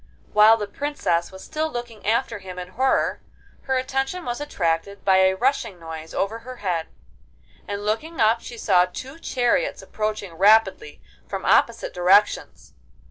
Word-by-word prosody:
While 215 Hz, +2 st, +7 dB
the 210 Hz, -, -3 dB
Princess 205 Hz, -7 st, -2 dB
was 190 Hz, 0 st, -11 dB
still 315 Hz, 0 st, -2 dB
looking 240 Hz, -4 st, -7 dB
after 230 Hz, 0 st, 0 dB
him 185 Hz, -2 st, -9 dB
in 180 Hz, 0 st, -6 dB
horror, 260 Hz, +7 st, +1 dB, 0.4 s
her 265 Hz, -1 st, +1 dB
attention 270 Hz, +7 st, -2 dB
was 240 Hz, +3 st, -3 dB
attracted 195 Hz, -, -2 dB
by 190 Hz, -1 st, +5 dB
a 190 Hz, 0 st, +4 dB
rushing 240 Hz, -5 st, -1 dB
noise 160 Hz, -1 st, -8 dB
over 215 Hz, +4 st, -2 dB
her 255 Hz, +2 st, -9 dB
head, 180 Hz, -8 st, -2 dB, 0.8 s
and 205 Hz, 0 st, -4 dB
looking 305 Hz, +11 st, -2 dB
up 225 Hz, +1 st, +3 dB
she 240 Hz, -, -9 dB
saw 180 Hz, -5 st, +4 dB
two 265 Hz, -, -9 dB
chariots 260 Hz, -, 0 dB
approaching 215 Hz, -4 st, -4 dB
rapidly 220 Hz, -, +3 dB, 0.2 s
from -, -, -5 dB
opposite -, -, +2 dB
directions. 190 Hz, +4 st, +2 dB
215 Hz, 150 wpm, -23 LUFS, 190-260 Hz, 0.8 s, While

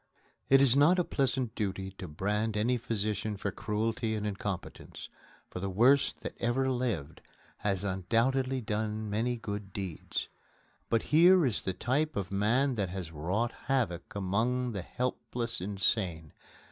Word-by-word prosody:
It 135 Hz, 0 st, +7 dB
is 135 Hz, -2 st, +5 dB
not 150 Hz, +6 st, +5 dB
a 180 Hz, -, +3 dB
pleasant 130 Hz, -6 st, 0 dB
duty 95 Hz, -3 st, -3 dB
to 90 Hz, -, -5 dB
brand 105 Hz, +7 st, -1 dB
any 120 Hz, +4 st, +2 dB
physician 110 Hz, -3 st, -2 dB
for 100 Hz, 0 st, -2 dB
cruelty 110 Hz, +2 st, -1 dB
and 105 Hz, -1 st, -3 dB
incompetence, 100 Hz, -2 st, -5 dB, 0.4 s
for -, -, -5 dB
the 95 Hz, +1 st, -2 dB
worst 125 Hz, +9 st, +3 dB
that -, -, -5 dB
ever 130 Hz, +3 st, +1 dB
lived 120 Hz, -, -2 dB, 0.4 s
has 100 Hz, -2 st, -1 dB
undoubtedly 120 Hz, +8 st, +1 dB
done 105 Hz, 0 st, -2 dB
many 120 Hz, +4 st, 0 dB
good 100 Hz, -3 st, -6 dB
deeds. 95 Hz, -5 st, -4 dB, 0.6 s
But 115 Hz, -1 st, +2 dB
here 175 Hz, +2 st, +7 dB
is 120 Hz, -5 st, +4 dB
the 95 Hz, -, -2 dB
type 150 Hz, +9 st, 0 dB
of 95 Hz, -1 st, -3 dB
man 120 Hz, +8 st, +2 dB
that 100 Hz, -6 st, -1 dB
has 90 Hz, -3 st, -5 dB
wrought 95 Hz, +10 st, -1 dB, 0.2 s
havoc 115 Hz, -12 st, -1 dB
among 115 Hz, +6 st, 0 dB
the 100 Hz, -4 st, -3 dB
helpless 120 Hz, +1 st, -3 dB
insane. 95 Hz, -5 st, -1 dB
110 Hz, 145 wpm, -31 LUFS, 95-125 Hz, 0.6 s, It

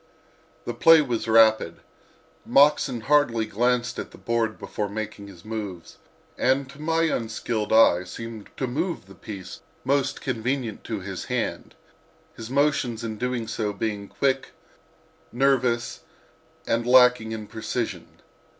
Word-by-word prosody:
The -, -, -3 dB
play 165 Hz, -1 st, +6 dB
was 120 Hz, -4 st, -3 dB
rapid. 110 Hz, -1 st, +4 dB, 0.7 s
Moxon 140 Hz, -4 st, +3 dB
hardly 120 Hz, -4 st, +2 dB
glanced 120 Hz, +2 st, 0 dB
at -, -, -5 dB
the -, -, -15 dB
board 115 Hz, -2 st, -1 dB
before 105 Hz, -1 st, -4 dB
making 105 Hz, -1 st, -6 dB
his 95 Hz, -2 st, -14 dB
moves, 105 Hz, -6 st, -6 dB, 0.4 s
and 130 Hz, +1 st, +2 dB
to 145 Hz, +1 st, -13 dB
my 165 Hz, +1 st, +1 dB
unskilled 115 Hz, -6 st, -2 dB
eye 100 Hz, -5 st, +5 dB
seemed 115 Hz, +3 st, -8 dB
to 130 Hz, -, -1 dB
move 160 Hz, -, -3 dB
the 95 Hz, -, -14 dB
piece 95 Hz, +1 st, -9 dB, 0.2 s
most 135 Hz, 0 st, 0 dB
convenient 125 Hz, -2 st, -3 dB
to 110 Hz, -3 st, -4 dB
his 95 Hz, 0 st, -6 dB
hand, -, -, -3 dB, 0.6 s
his 115 Hz, 0 st, -8 dB
motions 135 Hz, -4 st, +1 dB
in 110 Hz, -2 st, -5 dB
doing 125 Hz, -2 st, -2 dB
so 110 Hz, -2 st, -2 dB
being 100 Hz, -1 st, -3 dB
quick, 135 Hz, +2 st, -1 dB, 0.8 s
nervous 125 Hz, -2 st, +1 dB, 0.7 s
and 115 Hz, +1 st, 0 dB
lacking 125 Hz, -3 st, +5 dB
in 110 Hz, -1 st, -5 dB
precision. 110 Hz, +1 st, -5 dB
115 Hz, 130 wpm, -25 LUFS, 110-130 Hz, 0.8 s, play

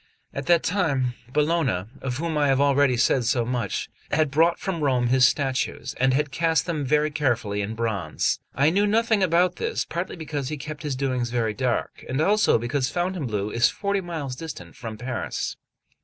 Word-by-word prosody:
At 135 Hz, 0 st, -5 dB
that 170 Hz, -1 st, +4 dB
time, 145 Hz, -9 st, +1 dB, 0.2 s
Bologna, 150 Hz, -, +1 dB, 0.2 s
of 130 Hz, -2 st, -3 dB
whom 165 Hz, +1 st, -2 dB
I 145 Hz, -1 st, +3 dB
have 135 Hz, -1 st, +3 dB
already 140 Hz, -2 st, +3 dB
said 125 Hz, +1 st, +3 dB
so 120 Hz, 0 st, +1 dB
much, 125 Hz, 0 st, -2 dB, 0.2 s
had 155 Hz, -1 st, +1 dB
brought 165 Hz, +4 st, +3 dB
from 170 Hz, -5 st, -3 dB
Rome 125 Hz, -4 st, +2 dB
his 130 Hz, 0 st, +6 dB
statues, 135 Hz, -2 st, -1 dB
and 130 Hz, +1 st, +4 dB
had 145 Hz, +2 st, 0 dB
cast 160 Hz, +2 st, +1 dB
them 160 Hz, -4 st, -2 dB
very 150 Hz, +3 st, +2 dB
carefully 120 Hz, -9 st, 0 dB
in 105 Hz, +2 st, -4 dB
bronze. 110 Hz, -9 st, -1 dB, 0.2 s
I 140 Hz, +4 st, +4 dB
knew 200 Hz, +3 st, +2 dB
nothing 220 Hz, 0 st, +2 dB
about 180 Hz, 0 st, +3 dB
this, -, -, -2 dB
partly 175 Hz, +2 st, -4 dB
because 150 Hz, -5 st, -4 dB
he 155 Hz, -, -3 dB
kept 150 Hz, +1 st, -7 dB
his 145 Hz, -4 st, -2 dB
doings 130 Hz, -2 st, -1 dB
very 115 Hz, -3 st, 0 dB
dark, 125 Hz, 0 st, -2 dB
and 130 Hz, +2 st, -1 dB
also 210 Hz, +7 st, +4 dB
because 125 Hz, +3 st, -1 dB
Fontainebleau 140 Hz, -, -2 dB
is 120 Hz, 0 st, +4 dB
forty 200 Hz, -1 st, -1 dB
miles 160 Hz, -7 st, -5 dB
distant 110 Hz, -, -8 dB
from 110 Hz, -2 st, -7 dB
Paris. 125 Hz, 0 st, -3 dB
140 Hz, 185 wpm, -24 LUFS, 125-165 Hz, 0.2 s, his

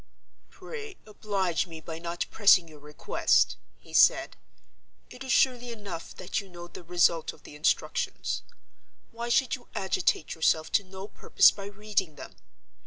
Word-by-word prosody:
"Pray 435 Hz, -4 st, -9 dB
oblige 195 Hz, -5 st, -2 dB
me 165 Hz, -2 st, -9 dB
by 160 Hz, +1 st, -7 dB
not 170 Hz, 0 st, -3 dB
pressing 195 Hz, -5 st, +5 dB
your 155 Hz, -2 st, -14 dB
request," 150 Hz, +1 st, +1 dB, 0.2 s
he -, -, -18 dB
said. -, -, +4 dB, 0.8 s
"It 250 Hz, -, -9 dB
is 260 Hz, -, -3 dB
surely 245 Hz, -2 st, +2 dB
enough 200 Hz, -7 st, -8 dB
that 185 Hz, +3 st, -3 dB
you 195 Hz, -, -15 dB
know 175 Hz, -1 st, -10 dB
the 175 Hz, -, -11 dB
result 170 Hz, -1 st, +2 dB
of -, -, -20 dB
the -, -, -12 dB
instructions. 150 Hz, -, -1 dB, 0.7 s
Why 235 Hz, +1 st, -5 dB
should 250 Hz, +1 st, +2 dB
you 245 Hz, -, -6 dB
agitate 185 Hz, -4 st, 0 dB
yourself 160 Hz, -1 st, +1 dB
to 200 Hz, -, +3 dB
no 190 Hz, +1 st, -9 dB
purpose -, -, +4 dB
by 200 Hz, -1 st, -9 dB
reading 200 Hz, -5 st, -2 dB
them? -, -, -11 dB
190 Hz, 155 wpm, -28 LUFS, 165-215 Hz, 0.8 s, pressing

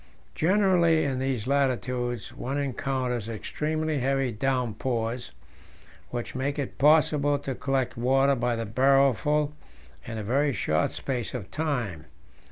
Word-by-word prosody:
Generally 175 Hz, -3 st, +3 dB
in 135 Hz, -3 st, -1 dB
these 130 Hz, -5 st, -1 dB
latitudes 125 Hz, -4 st, -1 dB
one 135 Hz, +3 st, -3 dB
encounters 130 Hz, -4 st, -2 dB
extremely 155 Hz, +6 st, -2 dB
heavy 135 Hz, 0 st, +1 dB
downpours, 120 Hz, 0 st, -2 dB, 0.8 s
which 120 Hz, -1 st, -5 dB
make 135 Hz, +3 st, -2 dB
it 140 Hz, -4 st, -4 dB
possible 145 Hz, 0 st, +4 dB
to 140 Hz, -1 st, -4 dB
collect 135 Hz, 0 st, -1 dB
water 135 Hz, +3 st, +3 dB
by 120 Hz, -2 st, 0 dB
the 115 Hz, 0 st, -3 dB
barrelful 135 Hz, +5 st, +3 dB, 0.5 s
in 115 Hz, -1 st, -6 dB
a 110 Hz, -, -4 dB
very 140 Hz, +6 st, +1 dB
short -, -, +1 dB
space 125 Hz, -3 st, -4 dB
of 105 Hz, -7 st, -6 dB
time. 120 Hz, -, -2 dB
135 Hz, 125 wpm, -27 LUFS, 120-145 Hz, 0.8 s, possible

